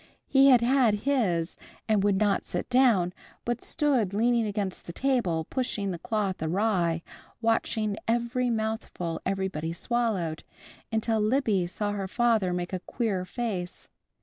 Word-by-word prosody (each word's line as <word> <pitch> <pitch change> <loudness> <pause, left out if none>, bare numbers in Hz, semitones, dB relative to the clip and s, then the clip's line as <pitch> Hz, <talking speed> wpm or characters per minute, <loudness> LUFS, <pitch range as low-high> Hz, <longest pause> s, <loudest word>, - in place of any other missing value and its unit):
He 270 0 +5
had 250 -3 +7
had 245 -3 +4
his, 190 -12 +1 0.3
and 215 -3 +2
would 200 -1 +3
not 205 -1 +2
sit - - -4
down, 230 -9 +4 0.3
but 240 0 -1
stood 255 - +1
leaning 235 +1 +2
against 200 -2 -3
the 170 - -6
table, 195 -11 0
pushing 220 -6 -2
the 175 - -5
cloth 200 -2 -2
awry, 170 -1 +1 0.4
watching 225 -2 0
every 240 +2 +1
mouthful 220 -7 -3
everybody 190 -4 -2
swallowed, 195 -7 -1 0.5
until 220 0 +1
Libby 215 -5 +2
saw 205 +3 -2
her 200 -2 -3
father 225 -3 +2
make 180 +1 -3
a 185 - -1
queer 195 -2 -2
face. 190 -4 -4
210 Hz, 140 wpm, -27 LUFS, 185-235 Hz, 0.5 s, had